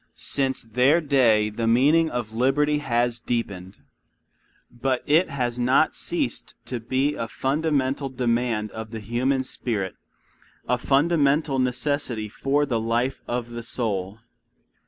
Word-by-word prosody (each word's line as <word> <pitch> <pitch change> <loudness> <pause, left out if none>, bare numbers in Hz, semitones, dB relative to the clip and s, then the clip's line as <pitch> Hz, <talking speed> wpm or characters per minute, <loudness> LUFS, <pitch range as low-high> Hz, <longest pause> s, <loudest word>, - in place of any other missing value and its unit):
Since 135 -1 -1
their 125 +8 +3
day 120 -8 +3
the 115 +2 -2
meaning 145 +8 +4
of 120 -4 -4
liberty 145 +5 +2
has 120 -3 0
deepened. 100 -5 -3 0.9
But 130 +1 -1
it 160 +5 +3
has 125 -3 -2
not 125 +2 +3
ceased - - -3
to 125 - -4
be 130 +5 0
a 115 - -4
fundamental 140 0 -1
demand 120 -4 -1
of 110 0 -7
the 110 0 -6
human 125 +5 0
spirit, 105 -7 -3 0.7
a 125 - +1
fundamental 145 0 +2
necessity 125 -3 -1
for 140 +6 0
the 120 -5 -1
life 120 +4 -1
of 120 -1 -3
the 120 0 -5
soul. 105 -4 -2
125 Hz, 130 wpm, -24 LUFS, 115-140 Hz, 0.9 s, meaning